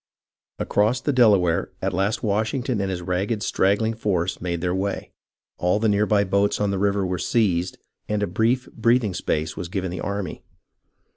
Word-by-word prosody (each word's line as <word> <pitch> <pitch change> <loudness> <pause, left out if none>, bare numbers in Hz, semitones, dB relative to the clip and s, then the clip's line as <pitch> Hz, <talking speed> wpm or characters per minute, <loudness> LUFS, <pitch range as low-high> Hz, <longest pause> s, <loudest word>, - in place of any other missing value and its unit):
Across 110 +5 +1
the 145 - 0
Delaware 100 -9 +4
at 95 0 -2
last 100 +4 0
Washington 110 +2 0
and 95 - -1
his 90 -2 -3
ragged 95 +4 -1
straggling 100 +5 +1
force 95 -5 -1
made 85 -1 -2
their 90 +1 -1
way, 100 +2 -3 0.5
all 90 +2 +2
the 110 +1 +1
near 105 0 +2
by 105 -2 +3
boats 100 +1 +1
on 105 -1 +1
the 100 - -1
river 100 0 +1
were 90 -1 -2
seized, 90 -4 +1 0.3
and 105 -1 0
a - - +3
brief 115 +7 0
breathing 115 -3 +2
space 80 -2 -2
was 85 - -5
given 95 -1 -3
the 90 - -5
army. 100 -1 -4
100 Hz, 175 wpm, -23 LUFS, 90-110 Hz, 0.5 s, Delaware